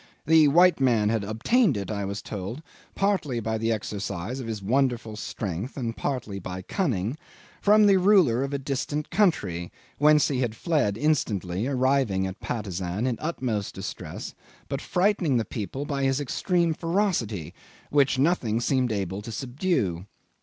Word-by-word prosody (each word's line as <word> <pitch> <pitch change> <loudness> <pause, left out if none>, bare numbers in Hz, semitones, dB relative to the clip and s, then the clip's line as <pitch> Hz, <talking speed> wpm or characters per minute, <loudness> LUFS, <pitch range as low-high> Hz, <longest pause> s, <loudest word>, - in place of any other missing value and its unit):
The 160 0 +6
white 175 +3 +5
man 115 -6 +3
had 110 -2 0
obtained 135 - +2
it, 100 +1 -4
I 100 -2 -2
was 100 +1 -4
told, 105 - -6 0.3
partly 185 -11 0
by 110 0 -2
the 115 +1 0
exercise 100 +1 -3
of 125 - -6
his 110 -2 -3
wonderful 120 0 0
strength 105 - -5
and 115 -3 -3
partly 115 -8 -3
by 95 0 -6
cunning, 125 - -1 0.4
from 210 +1 +6
the 200 -1 +6
ruler 180 - +4
of 140 - -3
a 140 - -1
distant 140 +2 -3
country, 95 - +1 0.3
whence 150 0 +5
he 135 -3 -1
had 120 -4 -1
fled 145 - 0
instantly, 110 - 0
arriving 130 -7 +1
in 95 - -3
Patusan 95 -2 -3
in 125 -3 0
utmost 125 -10 -2
distress, - - -6 0.4
but - - -3
frightening 180 -7 +1
the 115 - 0
people 120 +8 -5
by 140 -1 -2
his 135 0 +1
extreme 170 +4 0
ferocity, 165 - -1 0.4
which 140 -2 +3
nothing 130 -7 +1
seemed 125 0 +1
able 100 -1 -2
to 115 - -7
subdue. 120 - -1
125 Hz, 155 wpm, -26 LUFS, 105-150 Hz, 0.4 s, The